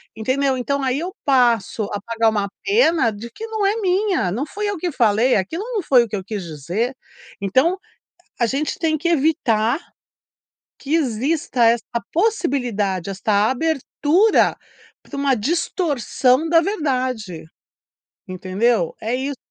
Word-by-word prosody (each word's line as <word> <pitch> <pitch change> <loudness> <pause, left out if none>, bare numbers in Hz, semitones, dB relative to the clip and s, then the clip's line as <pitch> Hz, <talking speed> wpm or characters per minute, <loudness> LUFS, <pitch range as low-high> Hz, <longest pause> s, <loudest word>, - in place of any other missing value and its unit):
entendeu? 260 +4 0
Então 280 +3 -1
aí 260 0 0
eu 365 +4 -5
passo 240 -6 +2
a 205 - -3
pagar 230 +1 +1
uma 205 -2 -1 0.2
pena 335 - +3
de 215 +3 -8
que 445 - -7
não 440 -2 -2
é 400 +2 +2
minha, 375 - +1
não 235 +9 -2
fui 415 +6 -4
eu 405 -1 -2
que 350 +1 -2
falei, 230 0 +3
aquilo 265 - -2
não 415 - -1
foi 255 -5 +5
o - - -5
que 215 - -4
eu 190 - -4
quis 205 -1 -5
dizer. 175 - -3 0.4
Então 260 - +2 0.6
a 240 - +3
gente 275 +6 -2
tem 315 -2 +1
que 340 +3 -1
evitar 275 -6 +2 1.0
que 285 +3 -3
exista 265 -2 +1
essa 230 0 +3 0.3
possibilidade, 245 - 0
esta 205 +2 +1
abertura 320 - +2 0.5
pra 285 - -9
uma 280 -1 +2
distorção 290 - 0
da 330 0 +5
verdade. 255 - -2 0.8
Entendeu? 185 +1 0
É 225 +3 -2
isso. 270 +1 -3
260 Hz, 145 wpm, -21 LUFS, 220-325 Hz, 1.0 s, foi